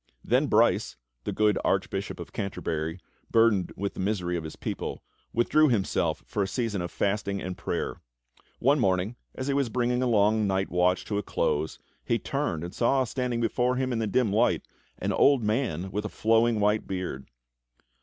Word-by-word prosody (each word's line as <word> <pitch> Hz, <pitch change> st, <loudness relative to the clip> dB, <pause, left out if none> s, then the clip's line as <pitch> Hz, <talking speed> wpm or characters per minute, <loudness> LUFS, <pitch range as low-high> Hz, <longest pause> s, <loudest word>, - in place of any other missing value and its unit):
Then -, -, +3 dB
Brice, -, -, +3 dB, 0.3 s
the -, -, -1 dB
good 105 Hz, -1 st, +2 dB
Archbishop -, -, -1 dB
of -, -, -8 dB
Canterbury, 80 Hz, -3 st, -3 dB, 0.3 s
burdened 115 Hz, -5 st, +3 dB
with 100 Hz, +1 st, -2 dB
the -, -, -10 dB
misery 95 Hz, -3 st, -1 dB
of 85 Hz, -, -3 dB
his 80 Hz, -, -7 dB
people, -, -, -5 dB, 0.3 s
withdrew 150 Hz, +6 st, +4 dB
himself 105 Hz, -6 st, 0 dB
for 105 Hz, -, -2 dB
a 95 Hz, -, +1 dB
season 110 Hz, -3 st, -2 dB
of 85 Hz, -, -3 dB
fasting 100 Hz, +1 st, -1 dB
and 95 Hz, -1 st, -4 dB
prayer. -, -, -3 dB, 0.6 s
One 140 Hz, +4 st, +3 dB
morning, 95 Hz, +1 st, +1 dB, 0.2 s
as 130 Hz, -, -4 dB
he 140 Hz, -, +1 dB
was 140 Hz, -3 st, +1 dB
bringing 125 Hz, +1 st, 0 dB
a 130 Hz, -, +2 dB
long 105 Hz, -1 st, +3 dB
night 95 Hz, 0 st, 0 dB
watch 90 Hz, +1 st, +2 dB
to 100 Hz, -1 st, -1 dB
a -, -, -1 dB
close, 80 Hz, -5 st, -1 dB, 0.3 s
he -, -, +1 dB
turned 80 Hz, 0 st, -2 dB
and 85 Hz, -, -6 dB
saw 130 Hz, +3 st, +2 dB
standing 125 Hz, -1 st, -2 dB
before 125 Hz, +2 st, +1 dB
him 130 Hz, 0 st, -1 dB
in 115 Hz, -, -1 dB
the 110 Hz, -, 0 dB
dim 105 Hz, 0 st, +1 dB
light 105 Hz, -, +2 dB, 0.3 s
an -, -, -1 dB
old 140 Hz, -4 st, +4 dB
man 105 Hz, -, -1 dB
with 105 Hz, +2 st, -2 dB
a 105 Hz, -, -3 dB
flowing 115 Hz, 0 st, +2 dB
white 105 Hz, +1 st, +2 dB
beard. 90 Hz, -8 st, -4 dB
105 Hz, 185 wpm, -27 LUFS, 95-120 Hz, 0.6 s, withdrew